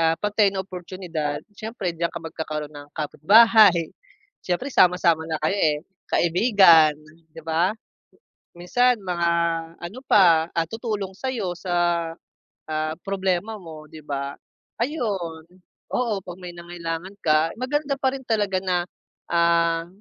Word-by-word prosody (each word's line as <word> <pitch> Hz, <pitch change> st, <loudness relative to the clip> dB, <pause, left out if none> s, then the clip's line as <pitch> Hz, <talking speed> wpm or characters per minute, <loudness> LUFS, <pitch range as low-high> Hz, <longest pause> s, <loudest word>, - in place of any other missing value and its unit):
ah, 165 Hz, 0 st, +3 dB
pantay 210 Hz, +1 st, +2 dB
na 190 Hz, -1 st, -3 dB
oportyunidad, 175 Hz, -5 st, -5 dB
siyempre 210 Hz, -3 st, -4 dB
d'yan 170 Hz, +1 st, -1 dB
ka -, -, -7 dB
magkakaroon 155 Hz, -2 st, -5 dB
ng 145 Hz, -1 st, -11 dB
kapitbahay, 200 Hz, +2 st, +5 dB, 0.5 s
siyempre 220 Hz, +10 st, -3 dB
sama-sama 170 Hz, -4 st, +3 dB
na 160 Hz, -, -1 dB
kayo 200 Hz, -, +1 dB
eh. 150 Hz, -1 st, +2 dB, 0.3 s
Kaibigan 175 Hz, -4 st, +5 dB, 0.4 s
'di 165 Hz, -, -11 dB
ba? 165 Hz, +4 st, +1 dB, 0.9 s
Minsan 245 Hz, +8 st, +2 dB
mga 175 Hz, -2 st, -1 dB, 0.5 s
ano 175 Hz, +8 st, -8 dB
pa, 170 Hz, -4 st, +5 dB
ah, 165 Hz, -1 st, 0 dB
tutulong 210 Hz, -1 st, -4 dB
sa'yo 215 Hz, -5 st, -3 dB
sa, 175 Hz, +1 st, -4 dB, 1.0 s
ah, 155 Hz, 0 st, -1 dB
problema 195 Hz, +2 st, -1 dB
mo 160 Hz, -3 st, -11 dB
'di 155 Hz, -, -11 dB
ba? 140 Hz, 0 st, -3 dB, 0.5 s
Ayun, 195 Hz, -, -3 dB, 0.5 s
oo, 240 Hz, -3 st, 0 dB
'pag 180 Hz, 0 st, -9 dB
may 180 Hz, -, -6 dB
nangailangan 170 Hz, +1 st, -6 dB
ka, 155 Hz, +1 st, +2 dB
maganda 285 Hz, +2 st, -1 dB
pa 265 Hz, -, +2 dB
rin 265 Hz, -1 st, -8 dB
talaga 205 Hz, -4 st, +1 dB
na, 180 Hz, -2 st, 0 dB, 0.5 s
ah, 170 Hz, -1 st, +2 dB
175 Hz, 130 wpm, -23 LUFS, 165-205 Hz, 1.0 s, kapitbahay